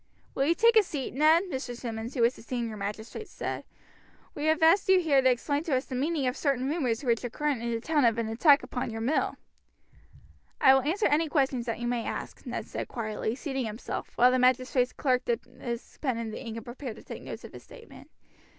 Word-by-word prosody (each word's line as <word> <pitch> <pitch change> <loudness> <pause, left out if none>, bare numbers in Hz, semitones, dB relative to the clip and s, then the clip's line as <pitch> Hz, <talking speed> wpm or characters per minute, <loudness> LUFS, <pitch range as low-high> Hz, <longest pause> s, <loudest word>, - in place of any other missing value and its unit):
"Will 275 - +1
you 335 - +3
take 465 +4 +4
a 440 - +8
seat, 290 -9 -5
Ned?" 310 +6 +5
Mr. 265 -9 -5
Simmonds, 230 +1 -5
who 240 - +2
was 235 +2 +3
the - - -13
senior 235 -1 -3
magistrate, 215 - -6
said. - - -5 0.7
"We 295 - -4
have 315 +1 +2
asked 375 +5 +5
you 380 -1 +7
here 295 -6 +3
to 260 - +4
explain 285 +4 0
to 290 - +1
us 255 - -1
the - - -8
meaning 285 +2 0
of 250 0 0
certain 270 -3 0
rumors 275 -6 -1
which 235 -2 +1
are 245 - -2
current 290 0 -1
in 235 - -2
the 230 -1 -1
town 295 +3 +1
of 230 -2 +3
an 230 -1 -1
attack 280 +6 +5
upon 250 -1 -3
your 225 0 -5
mill." 265 +7 0 1.2
"I 265 - +7
will 270 - +4
answer 330 - 0
any 305 +2 +2
questions 265 -5 0
that 230 - -1
you 240 - -4
may 240 -1 -1
ask," - - -6
Ned - - -4
said - - -5
quietly, 220 -1 -3
seating 265 -3 -3
himself, 215 +2 -6
while 250 +1 +6
the 255 - +2
magistrates' 255 0 +2
clerk 255 -2 0
dipped 235 0 -1
his 245 -1 -7
pen 260 -6 0
in 230 -1 -4
the 215 - -7
ink 230 -2 -6
and 230 - -8
prepared 245 -1 -7
to - - -13
take - - -8
notes - - -8
of - - -11
his - - -10
statement. 470 -2 -14
255 Hz, 230 wpm, -28 LUFS, 235-295 Hz, 1.2 s, a